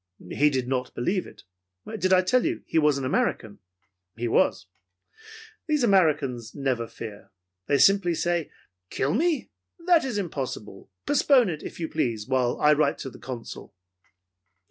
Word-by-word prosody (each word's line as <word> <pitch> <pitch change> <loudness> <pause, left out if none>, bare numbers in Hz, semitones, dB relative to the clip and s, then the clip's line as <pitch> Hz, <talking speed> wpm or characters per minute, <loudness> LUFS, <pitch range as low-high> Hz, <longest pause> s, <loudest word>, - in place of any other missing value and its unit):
He 150 +1 +3
did 130 -3 -2
not 125 -1 -2
believe 180 +10 -1
it. - - -15 0.6
Did 185 +1 +1
I 185 0 +5
tell 250 +7 +2
you 335 0 -2
he 160 - +1
was 150 -2 +3
an 135 - -3
American? 110 -5 -1 0.6
He 120 +2 -3
was. - - +2 1.0
These 300 -4 +1
Americans 145 - +1
never 130 -5 -1
fear. 105 -3 -9 0.4
They 140 - +3
say - - +6 0.2
simply, 175 -2 -1 0.4
"Kill 140 +3 -1
me? 320 - 0 0.3
That 350 -3 +5
is 255 -5 -3
impossible. 135 - -5 0.2
Postpone 270 -6 +4
it, 155 -3 -5
if - - -9
you 165 - -2
please, 115 -9 -2
while 130 -2 0
I 150 0 +5
write 150 +1 +1
to 135 - -7
the - - -14
Consul!" 120 -5 -8
150 Hz, 155 wpm, -25 LUFS, 125-185 Hz, 1.0 s, say